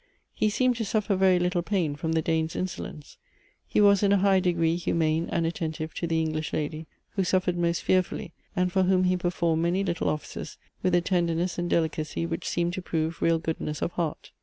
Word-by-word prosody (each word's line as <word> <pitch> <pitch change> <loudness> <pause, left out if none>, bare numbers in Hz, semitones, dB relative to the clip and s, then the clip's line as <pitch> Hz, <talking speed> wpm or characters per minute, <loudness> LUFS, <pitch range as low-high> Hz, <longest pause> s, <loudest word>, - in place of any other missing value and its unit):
He 215 - +1
seemed 250 +3 +1
to 230 - -1
suffer 210 -1 0
very 190 -1 +4
little 180 0 +1
pain 175 -6 -1
from 160 +2 -2
the 160 -1 +1
Dane's 160 0 0
insolence. 175 -5 -6 0.5
He - - +1
was 200 -2 +6
in 200 -1 +3
a 200 - +5
high 195 0 +4
degree 170 -2 +1
humane 165 -1 0
and 165 - +1
attentive 160 -1 -3
to 170 - -3
the 165 0 +1
English 155 -1 -2
lady, 155 +1 -3 0.2
who 195 - 0
suffered 180 0 +1
most 170 -1 0
fearfully, 185 -2 0 0.2
and 180 -1 +1
for 190 0 +2
whom 185 0 +3
he 185 0 +3
performed 170 -2 0
many 175 +3 +1
little 170 -4 -1
offices 150 - -5 0.2
with 185 -1 +2
a 175 - +4
tenderness 175 0 0
and 175 0 -1
delicacy 160 0 0
which 165 0 -4
seemed 175 0 0
to 185 - -4
prove 160 -2 -2
real 165 0 +3
goodness 160 -2 -3
of - - -1
heart. 165 -4 -3
170 Hz, 205 wpm, -27 LUFS, 160-185 Hz, 0.5 s, was